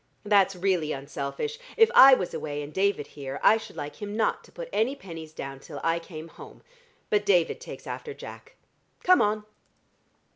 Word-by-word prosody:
That's 200 -2 +4
really 180 -4 0
unselfish: 140 - -5 0.2
if 450 +1 +6
I 270 - +10
was 185 - -4
away 145 -1 -4
and 145 +1 -9
David 195 -6 +1
here, 140 -1 -7
I 220 - +7
should 225 - -10
like 145 0 -6
him 205 0 -5
not 225 - 0
to - - -19
put - - -7
any 240 +6 +1
pennies 165 - -9
down 135 -3 -7
till - - -9
I 165 +1 +1
came 165 -1 -9
home. - - -14 0.5
But 210 -1 +3
David 180 -5 +2
takes - - -9
after 460 - -6
Jack. - - -11 0.5
Come 365 0 +6
on!" 210 0 +1
190 Hz, 180 wpm, -27 LUFS, 155-215 Hz, 0.5 s, I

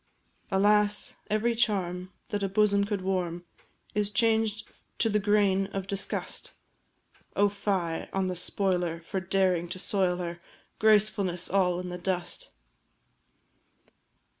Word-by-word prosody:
Alas 205 +1 +3
every 215 +3 +1
charm 185 -5 0 0.2
that 205 -3 -2
a 195 - 0
bosom 200 0 +3
could 205 -2 -2
warm 180 -2 -2 0.5
Is 210 -1 +1
changed 220 0 +1 0.3
to 225 - +2
the 210 0 +2
grain 200 -2 +2
of 195 -1 -4
disgust! 195 0 -2 0.8
Oh, 205 0 +4
fie 195 -5 -2
on 195 0 0
the 185 -1 -2
spoiler 180 -2 0
for 190 +3 -3
daring 185 -2 +1
to - - -5
soil 185 -2 +1
her 175 -1 -5 0.4
Gracefulness 205 -4 +2
all 180 -2 +2
in 180 0 -5
the 180 0 -5
dust! 180 -1 -2
195 Hz, 125 wpm, -28 LUFS, 180-210 Hz, 0.8 s, Oh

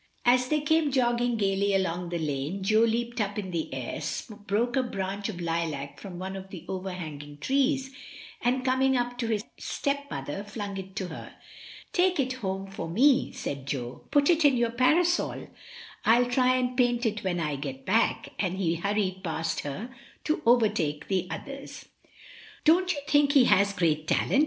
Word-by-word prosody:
As 250 +1 +4
they 300 +2 +1
came 310 0 +2
jogging 240 -2 +2
gaily 200 -1 +1
along 180 -2 -1
the 175 - -2
lane 155 +4 -2
Jo 215 +3 +3
leaped 235 +1 +1
up 205 0 -2
in 190 -3 -4
the 165 -2 -3
air, 130 +1 -4 0.5
broke 235 +4 +1
a 265 - +4
branch 200 -3 -3
of 185 -5 -6
lilac 165 -5 -3
from 190 -3 -8
one 190 +2 -5
of 190 0 -8
the 180 -3 -9
overhanging 160 -6 -6
trees, 270 - +1 0.5
and 255 +1 +1
coming 260 0 +3
up 245 0 -2
to 235 - -1
his 215 -2 0 0.2
stepmother 280 - -3
flung 205 -1 -5
it 190 0 -8
to 190 -4 -3
her. - - -9 0.6
"Take 360 -2 +3
it 260 -1 +1
home 195 -1 -2
for 195 -4 -6
me," 260 - +4
said 140 -1 -5
Jo; 125 -3 -4
"put 285 -1 +3
it 335 -1 +3
in 280 -3 +5
your 235 -1 +1
parasol. 330 +9 +2 0.5
FU 240 +2 +5
try 255 0 +4
and 250 0 0
paint 245 -1 +2
it 215 -1 -1
when 180 -2 -1
I 150 -3 -1
get 135 -1 -6
back," 225 +4 +2
and 185 -2 0
he 170 -3 0
hurried 195 0 -1
past 165 -2 -2
her 205 - -5 0.3
to 310 - 0
overtake 210 -11 +2
the 185 -2 0
others. 275 +4 -7 0.8
"Don't 360 +4 +5
you 290 -5 -3
think 290 -1 +4
he 275 -4 +7
has 200 -3 +4
great 160 -5 0
talent?" 270 - +2
205 Hz, 175 wpm, -28 LUFS, 175-255 Hz, 0.8 s, he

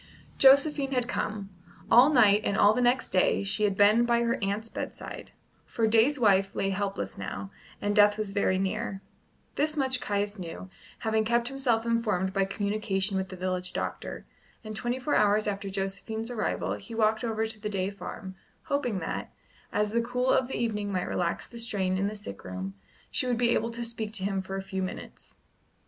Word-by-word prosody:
Josephine 275 0 +5
had 250 -2 0
come. 205 -4 -3 0.4
All 250 +4 +8
night 215 -7 +5
and 200 - 0
all 205 0 +6
the 250 - 0
next 245 +2 +2
day 185 +1 +3
she 205 +2 +1
had 200 -2 0
been 210 +3 +5
by 235 0 +2
her 235 0 0
aunt's 200 +3 -1
bedside; - - -7 0.4
for 230 - 0
Day's 230 +6 +4
wife 195 -3 +3
lay 195 - 0
helpless 195 - -3
now, 95 0 -5 0.3
and 205 0 -1
death 205 0 +6
was 215 -2 -2
very 195 -2 +1
near. 195 +1 -2 0.5
This 305 +1 0
much 260 -3 +1
Caius 205 0 -1
knew, 180 +2 -7 0.3
having 220 -1 +1
kept 235 +2 +1
himself 250 -5 0
informed 210 -5 0
by 195 -1 +2
communication 200 0 -1
with 190 -1 -1
the 185 - -7
village 185 0 -3
doctor, - - -4 0.4
and 215 -1 -7
twenty 240 +3 -1
four 260 +3 -1
hours 210 +1 +3
after 200 -1 -3
Josephine's 200 +4 -3
arrival 225 -3 -1
he 215 +3 -8
walked 220 +1 +2
over 225 -1 0
to 220 -1 -4
the 210 - -3
Day 195 -1 -1
farm, 195 -1 -8 0.3
hoping 265 -7 -1
that, - - -4 0.4
as 210 0 0
the 235 +1 +2
cool 250 +2 0
of 255 - +3
the 265 - -4
evening 210 -3 -1
might 185 -2 -1
relax 170 -1 -1
the 235 - -9
strain 190 -5 0
in 200 - +1
the 210 - -4
sick 150 - -9
room, 95 +1 -5 0.4
she 255 - 0
would 245 -2 +1
be 235 0 +3
able 230 0 +1
to 235 0 -4
speak 225 -2 -4
to 200 -4 -3
him 195 -1 0
for 190 +1 -6
a 195 - -3
few 190 0 -4
minutes. 185 - -7
210 Hz, 195 wpm, -28 LUFS, 195-235 Hz, 0.5 s, All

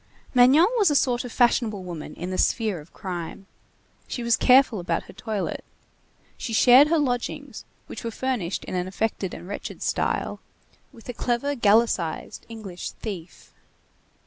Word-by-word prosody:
Magnon 260 +6 +6
was 400 -5 +5
a 295 - +1
sort 250 -3 +2
of 245 - -7
fashionable 230 -5 +2
woman 170 -4 -7
in 180 +2 -5
the 185 - -2
sphere 215 -7 +1
of 150 +2 -15
crime. 180 -1 -6 0.6
She 245 - -4
was 235 -1 +3
careful 255 -4 +5
about 170 -1 -2
her - - -14
toilet. 215 -4 -4 0.7
She 230 - -5
shared 250 +7 +7
her 330 +2 +2
lodgings, 245 -5 -3 0.2
which - - -8
were 230 - -2
furnished 225 -7 -3
in - - -7
an 180 0 -1
affected 195 -1 -2
and 175 - -10
wretched 205 - -6
style, - - -1 0.5
with 235 -5 -16
a 245 - -4
clever 245 +4 -1
gallicized 210 - +1
English 210 -6 -7
thief. 185 -6 -8
225 Hz, 155 wpm, -25 LUFS, 185-245 Hz, 0.7 s, shared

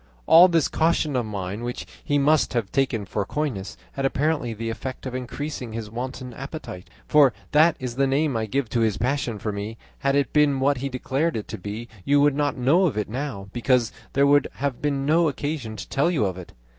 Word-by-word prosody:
"All 175 +3 +8
this 165 -4 +2
caution 160 -3 +1
of 120 -3 0
mine, 100 +1 -4
which 120 0 -4 0.2
he 145 - +1
must 145 +1 +3
have 115 -5 -1
taken 130 -6 0
for 100 +1 -2
coyness, 105 -7 -3
had 135 - -4
apparently 140 -2 0
the 115 +1 -4
effect 130 +4 -6
of 130 - -4
increasing 130 -1 -5
his 110 -2 -5
wanton 125 +1 -5
appetite 135 - -8 0.2
for 145 -5 +5 0.2
that 155 +2 +5
is 125 -1 -5
the 135 0 +3
name 140 0 +1
I 110 -1 -1
give 135 +3 -1
to 120 - 0
his 110 -3 +1
passion 125 -1 -1
for 105 +1 -3
me; 105 +2 -5 0.2
had 140 0 +1
it 140 -1 +1
been 145 -3 +3
what 140 +1 +2
he 140 +2 -3
declared 135 +4 -1
it 105 - -5
to 110 - -5
be, 105 +5 -6 0.2
you 145 +6 +3
would 145 0 +4
not 145 -1 0
know 155 +10 +4
of 125 -10 -3
it 105 - -2
now, 115 -6 -5
because 120 -1 +2 0.2
there 140 +1 +4
would 145 0 +4
have 140 -3 -3
been 140 -2 0
no 165 +3 +4
occasion 145 -5 -3
to 105 - -7
tell 140 +5 +1
you 150 -12 +1
of 95 -2 -2
it. 90 -2 -10
130 Hz, 220 wpm, -24 LUFS, 115-145 Hz, 0.2 s, All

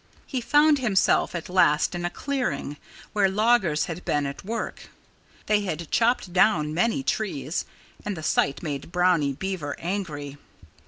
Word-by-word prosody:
He 255 - -3
found 295 +4 +4
himself 210 -7 +2
at 170 - -4
last 180 -5 +3
in 175 0 -3
a - - 0
clearing, 175 - -3 0.4
where 200 -2 +3
loggers 195 -7 +2
had 170 +1 -6
been 145 -1 0
at 140 0 -6
work. 225 +4 -5 0.6
They 210 -1 +2
had 170 -5 -4
chopped 230 -6 +1
down 180 -6 +3
many 230 - +1
trees. 170 - -2 0.4
And 205 -3 -4
the 160 - -7
sight 140 -1 +1
made 145 0 -5
Brownie 175 -6 +2
Beaver 165 -2 -4
angry. 155 -6 -4
180 Hz, 150 wpm, -25 LUFS, 150-215 Hz, 0.6 s, found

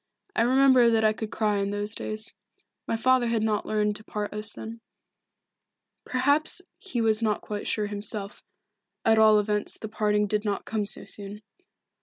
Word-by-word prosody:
I - - +2
remember 255 0 +5
that 225 -1 +2
I 215 0 +4
could 220 0 -5
cry 210 -2 0
in 200 0 -1
those 205 +1 -2
days. 215 -1 -3 0.5
My 225 - 0
father 255 +1 +3
had 230 -2 0
not 215 -1 0
learned 210 -1 0
to 215 - -13
part 210 -1 -4
us 210 +1 -3
then. 230 +1 -8 1.3
Perhaps 285 +7 +1 0.2
he 255 -12 -3
was 220 0 +2
not 215 -2 0
quite 205 -1 -5
sure 215 - 0
himself, 205 0 -4 0.6
at 225 0 +5
all 215 -1 +7
events 210 0 -1
the 220 - -6
parting 210 -1 +1
did 210 +1 -1
not 205 -2 -2
come 215 -2 -2
so - - -1
soon. 205 +1 -5
215 Hz, 175 wpm, -26 LUFS, 210-230 Hz, 1.3 s, all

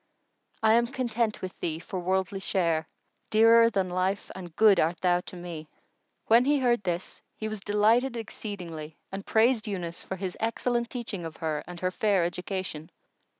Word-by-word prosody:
I 220 0 +6
am 235 +1 +4
content 235 -4 -1
with 185 - -6
thee 160 -2 -2
for 180 +3 -5
worldly 190 +2 -1
share 165 -4 0 0.2
* - - -46
Dearer 230 +1 +6
than 195 -4 0
life 185 +2 -1
and 175 -3 -9
good 210 -2 +6
art 165 +3 +1
thou 180 -1 +3
to 180 - -10
me!" 170 -3 -7 0.6
When 235 +3 +5
he 290 +1 +3
heard 245 -4 +2
this, 180 -2 -4
he 215 - -4
was 215 -1 -4
delighted 220 +5 +2
exceedingly 175 -8 -6
and 195 +1 -5
praised 225 0 +3
Yunus 175 -4 -4
for 190 - -5
his 185 -1 -4
excellent 235 +1 0
teaching 230 -7 -5
of 165 -1 -7
her 155 -2 -2
and 175 -1 -8
her 185 0 0
fair 195 -3 +2
education. 180 -3 -4
195 Hz, 175 wpm, -28 LUFS, 175-225 Hz, 0.6 s, I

